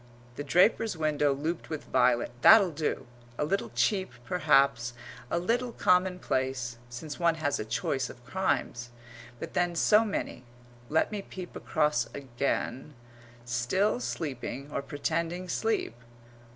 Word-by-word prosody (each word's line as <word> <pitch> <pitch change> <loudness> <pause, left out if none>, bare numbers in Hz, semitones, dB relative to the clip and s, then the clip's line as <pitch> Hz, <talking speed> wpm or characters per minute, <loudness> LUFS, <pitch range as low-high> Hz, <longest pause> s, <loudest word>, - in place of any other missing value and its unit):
The 145 - -4
draper's 180 - +3
window 150 -2 +2
looped 155 +5 -3
with 155 -2 -4
violet 125 -2 +2
that'll 200 - +8
do; 150 -3 -2 0.3
a - - 0
little 195 +6 -1
cheap 185 - +1 0.2
perhaps, 135 -7 +2 0.3
a - - 0
little 235 +7 0
commonplace 130 -10 +1
since 145 +5 -7
one 170 -1 +3
has 150 -3 -1
a - - -3
choice 125 +4 -1
of 120 - -13
crimes, 125 -7 -1 0.5
but - - -7
then 175 -1 +1
so 210 +6 +5
many 205 - -4 0.5
(let 160 +7 +2
me 210 -1 -3
peep 185 -2 -9
across 150 -1 +1
again 135 +1 -3 0.5
still 125 - +1
sleeping, 130 +2 -4
or - - -2
pretending 165 +5 -2
sleep! 220 - -1
150 Hz, 130 wpm, -29 LUFS, 130-180 Hz, 0.5 s, that'll